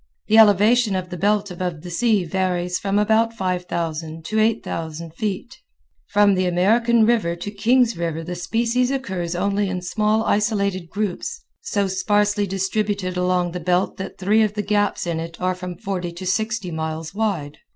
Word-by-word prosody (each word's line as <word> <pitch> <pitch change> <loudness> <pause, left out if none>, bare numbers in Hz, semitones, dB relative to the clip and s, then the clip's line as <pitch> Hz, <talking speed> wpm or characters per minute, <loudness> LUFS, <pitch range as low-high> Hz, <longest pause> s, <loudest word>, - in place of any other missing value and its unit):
The 220 +1 +5
elevation 215 +1 +5
of 185 -1 -4
the - - -4
belt 205 +2 +1
above 175 -3 -4
the 175 - -7
sea 210 0 +2
varies 180 0 -1
from 200 0 0
about 220 +2 +3
5000 170 -4 -3
to 220 - 0
8000 165 -7 -2
feet. 210 +6 -4 0.5
From 205 -1 +4
the 185 -1 +1
American 225 +6 +3
River 220 -8 +2
to 175 +4 -6
Kings 235 +3 +2
River 165 -1 -3
the 175 +2 -5
species 230 +8 0
occurs 190 -11 -3
only 200 +2 0
in 185 -1 -3
small 215 +4 +1
isolated 200 -5 0
groups 210 - -3 0.2
so 205 - -1
sparsely 205 +2 +1
distributed 195 0 -1
along 180 -1 +1
the 180 - -4
belt 180 +2 0
that 190 0 -6
three 205 +4 +3
of 215 -1 +1
the 210 - -1
gaps 205 -1 0
in 170 -2 -2
it 165 0 -7
are 185 0 0
from 180 -1 -7
forty 190 -5 -3
to 180 +2 -8
sixty 215 0 -1
miles 160 0 -4
wide. 195 -9 -2
190 Hz, 170 wpm, -22 LUFS, 175-215 Hz, 0.5 s, The